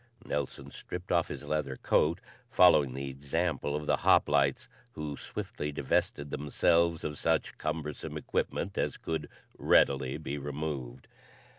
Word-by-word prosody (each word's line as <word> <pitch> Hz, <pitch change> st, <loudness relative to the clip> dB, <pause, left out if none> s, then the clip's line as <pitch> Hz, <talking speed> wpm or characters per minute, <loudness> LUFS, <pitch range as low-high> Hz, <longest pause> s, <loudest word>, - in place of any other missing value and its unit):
Nelson 70 Hz, -1 st, -3 dB
stripped 90 Hz, 0 st, -7 dB
off -, -, +3 dB
his -, -, -6 dB
leather 75 Hz, -3 st, -2 dB
coat, 85 Hz, +6 st, +2 dB, 0.3 s
following 75 Hz, -8 st, +5 dB
the 70 Hz, 0 st, -4 dB
example 70 Hz, +3 st, -2 dB
of 75 Hz, 0 st, -3 dB
the -, -, +2 dB
hoplites, 70 Hz, -2 st, +3 dB, 0.3 s
who 75 Hz, -2 st, -4 dB
swiftly 75 Hz, +1 st, -5 dB
divested 70 Hz, +1 st, -1 dB
themselves 85 Hz, +3 st, +2 dB
of 75 Hz, -2 st, -4 dB
such -, -, 0 dB
cumbersome 75 Hz, -2 st, -4 dB
equipment 95 Hz, -, -2 dB
as -, -, -1 dB
could 80 Hz, -1 st, -4 dB, 0.3 s
readily 70 Hz, 0 st, +3 dB
be 75 Hz, -2 st, -4 dB
removed. 70 Hz, -3 st, -5 dB
75 Hz, 130 wpm, -30 LUFS, 70-80 Hz, 0.3 s, following